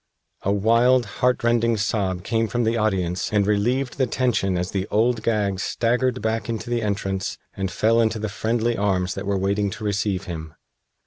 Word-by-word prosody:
A 100 - 0
wild, 115 +5 +4 0.2
heartrending 120 -2 +2
sob 100 -4 -1
came 115 +1 0
from 120 +3 -1
the 115 +1 +1
audience 95 -5 0
and 105 -2 +2
relieved 120 +6 0
the 130 - +3
tension 110 -7 0
as 90 +1 -2
the 95 0 -2
Old 115 +2 +2
Gag 105 -4 0
staggered 125 +3 0
back 110 +1 -1
into 115 +1 -4
the 120 -1 +1
entrance 100 -2 -2 0.2
and 95 -1 -3
fell 115 +4 +2
into 110 0 +1
the 110 0 -3
friendly 115 +3 -1
arms 95 -3 0
that 95 0 -6
were 100 -1 +1
waiting 100 +2 0
to 110 +2 -7
receive 100 -2 -1
him. 80 -3 -7
110 Hz, 180 wpm, -23 LUFS, 100-115 Hz, 0.2 s, wild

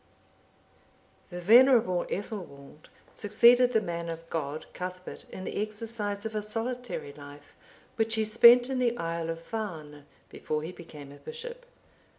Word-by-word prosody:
D.] 175 - -10
The 180 - -5
venerable 225 -4 +5
Ethelwald(766) 175 -9 -7 0.3
succeeded 235 +4 +5
the 220 - +3
man 170 -2 -4
of 165 0 -7
God, 155 -1 -3
Cuthbert, 180 0 -7
in 185 - -8
the 200 - -3
exercise 215 -1 -4
of 220 - -4
a 215 - -1
solitary 225 - -4
life, 145 0 -13 0.4
which 225 0 +2
he 220 - +1
spent 235 +3 +7
in 260 - -1
the 240 -1 +1
isle 165 0 -3
of 165 - -3
Farne(767) 160 -10 -6 0.3
before 155 0 -4
he 165 - -5
became 150 -5 -12
a 145 - -13
bishop. 485 - -9
205 Hz, 150 wpm, -28 LUFS, 165-230 Hz, 0.4 s, spent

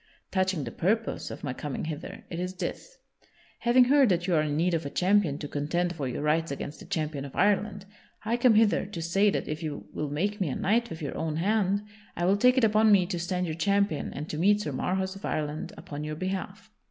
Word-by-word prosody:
Touching 185 -5 +1
the 115 - -5
purpose 220 - -1
of - - -8
my 135 -4 -2
coming 145 +2 -4
hither, 155 0 -6
it 170 - -4
is 180 +1 -3
this: - - -5 0.6
having 245 +1 +5
heard 270 0 +5
that 175 -2 +1
you 180 - 0
are 155 - +4
in 150 -1 -1
need 175 +2 +2
of 165 - 0
a 140 - -4
champion 180 -3 +2
to 150 - -5
contend 170 +5 -1
for 140 -5 -3
your 125 +3 -3
rights 160 +2 +1
against 140 +2 -5
the - - -11
champion 155 -3 -2
of 140 - -9
Ireland, 200 0 +1 0.4
I 230 +2 +1
come 240 -2 +5
hither 215 -3 +3
to 200 -4 -7
say 195 +5 +3
that - - -2
if 155 +2 -4
you 145 -11 -5
will 150 - -3
make 200 +8 -1
me 175 - +1
a - - -2
knight 230 +4 +1
with 160 -1 -7
your 140 - -4
own 160 -1 -2
hand, 200 +3 +1 0.3
I 175 - 0
will 190 +2 +4
take 250 +4 +4
it 260 - +4
upon 215 0 +5
me 195 -3 +5
to 175 -1 -3
stand 180 +1 -1
your 160 - -3
champion 200 -1 +1
and 150 +2 -6
to 155 - -4
meet 205 +4 +4
Sir 150 - -3
Marhaus 190 +7 -1
of 195 - -12
Ireland 150 0 -3
upon 145 0 -7
your 155 0 -4
behalf." 185 +3 -5
180 Hz, 240 wpm, -28 LUFS, 155-205 Hz, 0.6 s, having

